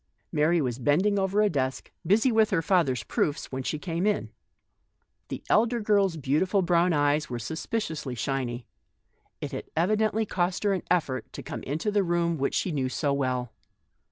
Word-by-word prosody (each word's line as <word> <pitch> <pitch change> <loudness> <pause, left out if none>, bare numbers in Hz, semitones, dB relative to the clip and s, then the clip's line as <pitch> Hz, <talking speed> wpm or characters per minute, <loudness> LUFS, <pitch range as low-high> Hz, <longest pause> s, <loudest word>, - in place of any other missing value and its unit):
Mary 160 +3 +3
was 125 -4 -2
bending 185 - +2
over 195 +2 +2
a - - +4
desk, 130 -3 -2 0.2
busy 225 +6 +4
with 220 -1 +4
her 185 -5 +1
father's 155 - +2
proofs, 145 - -1
when 130 0 -3
she 155 - -2
came 170 +4 -2
in. 210 - 0 1.0
The - - -6
elder 235 +2 +3
girl's 200 -5 +2
beautiful 160 +8 +1
brown 175 0 +3
eyes 145 0 +2
were 120 - -3
sus 120 +8 -5
piciously 155 - -3
shiny; 125 -2 -2 0.8
it 145 - -4
had 130 - -6
evidently 215 +5 +2
cost 180 -1 -1
her 205 -1 +3
an 190 - -1
effort 150 -8 0
to - - -7
come - - -6
into 160 +9 -2
the 205 0 +3
study 170 -1 +1
which 140 -2 -1
she 185 - 0
knew 135 -4 -1
so 140 +1 0
well. 125 -4 -1
165 Hz, 180 wpm, -27 LUFS, 140-195 Hz, 1.0 s, a